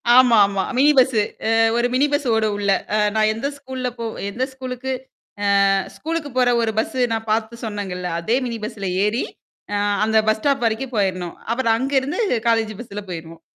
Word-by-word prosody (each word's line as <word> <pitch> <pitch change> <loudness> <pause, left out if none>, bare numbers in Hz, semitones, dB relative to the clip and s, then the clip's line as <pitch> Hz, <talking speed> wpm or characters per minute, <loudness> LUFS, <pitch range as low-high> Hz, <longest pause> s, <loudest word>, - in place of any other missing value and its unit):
ஆமா, 250 -3 +7
ஆமா. 200 -1 -1
Mini 285 +3 +6
bus. 260 0 +5 0.4
அ - - +3 0.2
ஒரு 240 +1 +2
மினி 275 - +4
பஸ்ஸ 290 -2 0
ஓடும் 215 -2 +1
உள்ள. 200 -1 +1 0.2
அ - - +3 0.2
நான் 215 0 +3
எந்த 225 +6 -3
ஸ்கூல்ல 260 -2 -4
போ 230 - -3 0.2
எந்த 250 +6 -2
ஸ்கூலுக்கு 260 0 -5 0.8
அ 195 - +4 0.2
ஸ்கூலுக்கு 320 -2 -3
போற 250 -1 +4
ஒரு 225 -1 +1
பஸ்ஸு 255 +3 -1
நான் 225 0 -3
பார்த்து 225 +1 -1
சொன்னேங்கல்ல. 195 -4 -4
அதே 225 +8 +1
மினி 235 -1 -4
பஸ்ல 200 -3 -4 0.2
ஏறி, 220 +4 0 0.5
ஆ - - +1 0.3
அந்த 220 0 +2
பஸ் 220 - +2
ஸ்டாப் 275 -1 +1
வரைக்கும் 245 +3 -3
போயிறணும். 185 -3 -1 0.2
அப்புறம் 235 -3 +2
அங்கருந்து 270 - 0 0.3
காலேஜ் 225 -1 +1
பஸ்ல 210 -3 -7
போயிருவோம். 165 -1 -8
230 Hz, 175 wpm, -21 LUFS, 210-260 Hz, 0.8 s, ஆமா